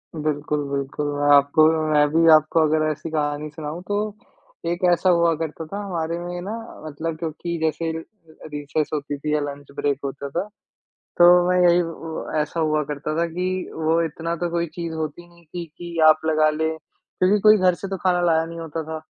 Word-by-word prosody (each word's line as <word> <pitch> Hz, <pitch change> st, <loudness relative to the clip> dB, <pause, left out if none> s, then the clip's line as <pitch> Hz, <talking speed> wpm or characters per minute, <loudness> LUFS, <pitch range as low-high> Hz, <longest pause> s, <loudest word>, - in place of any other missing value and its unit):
बिल्कुल, 150 Hz, -1 st, -2 dB
बिल्कुल। 140 Hz, +1 st, -3 dB
मैं 145 Hz, 0 st, +1 dB
आपको 145 Hz, +3 st, +4 dB, 0.3 s
मैं 150 Hz, -1 st, +4 dB
भी 165 Hz, +2 st, +3 dB
आपको 155 Hz, +1 st, +5 dB
अगर 155 Hz, 0 st, +2 dB
ऐसी 155 Hz, +2 st, -4 dB
कहानी 150 Hz, -1 st, -2 dB
सुनाऊँ 150 Hz, +3 st, -6 dB
तो 205 Hz, -, -1 dB, 0.8 s
एक 175 Hz, +2 st, -4 dB
ऐसा 180 Hz, +2 st, +2 dB
हुआ 170 Hz, -1 st, +4 dB
करता 160 Hz, 0 st, -5 dB
था 195 Hz, -, -7 dB
हमारे 170 Hz, -2 st, -2 dB
में 175 Hz, 0 st, -5 dB
ना 195 Hz, +4 st, -5 dB, 0.3 s
मतलब 155 Hz, +2 st, -4 dB
क्योंकि 170 Hz, +1 st, -4 dB
जैसे 160 Hz, +1 st, 0 dB
अ, 160 Hz, -, -5 dB, 0.5 s
रिसेस 145 Hz, +1 st, -2 dB
होती 145 Hz, -1 st, -3 dB
थी 150 Hz, +1 st, -2 dB
या 150 Hz, -, +2 dB
लंच 145 Hz, -1 st, -7 dB
ब्रेक 140 Hz, -2 st, +1 dB
होता 140 Hz, +1 st, -5 dB
था। 175 Hz, +8 st, -3 dB, 0.7 s
तो 175 Hz, 0 st, +7 dB
मैं 180 Hz, -, +3 dB
यही 175 Hz, 0 st, +5 dB
अ, 165 Hz, -2 st, -4 dB
ऐसा 160 Hz, +2 st, -2 dB
हुआ 155 Hz, -1 st, +1 dB
करता 150 Hz, +2 st, -3 dB
था 170 Hz, -, +2 dB
कि 180 Hz, +1 st, -1 dB, 0.3 s
वो 160 Hz, +1 st, +1 dB
इतना 165 Hz, +1 st, -3 dB
तो 175 Hz, +1 st, -2 dB
कोई 170 Hz, 0 st, -1 dB
चीज़ 170 Hz, -2 st, -4 dB
होती 160 Hz, +2 st, -5 dB
नहीं 170 Hz, 0 st, -22 dB
थी 175 Hz, +2 st, -6 dB
कि 170 Hz, -1 st, -7 dB
आप 155 Hz, +1 st, +4 dB
लगा 155 Hz, -1 st, +3 dB
लें 160 Hz, +1 st, -1 dB
क्योंकि 185 Hz, +5 st, -1 dB
कोई 215 Hz, +1 st, +7 dB
घर 185 Hz, -2 st, +3 dB
से -, -, -2 dB
तो 195 Hz, -, -3 dB
खाना 180 Hz, -1 st, +3 dB
लाया 160 Hz, 0 st, +3 dB
नहीं 165 Hz, 0 st, -8 dB
होता 160 Hz, 0 st, -4 dB
था। 160 Hz, -1 st, -5 dB
160 Hz, 195 wpm, -23 LUFS, 150-170 Hz, 0.8 s, तो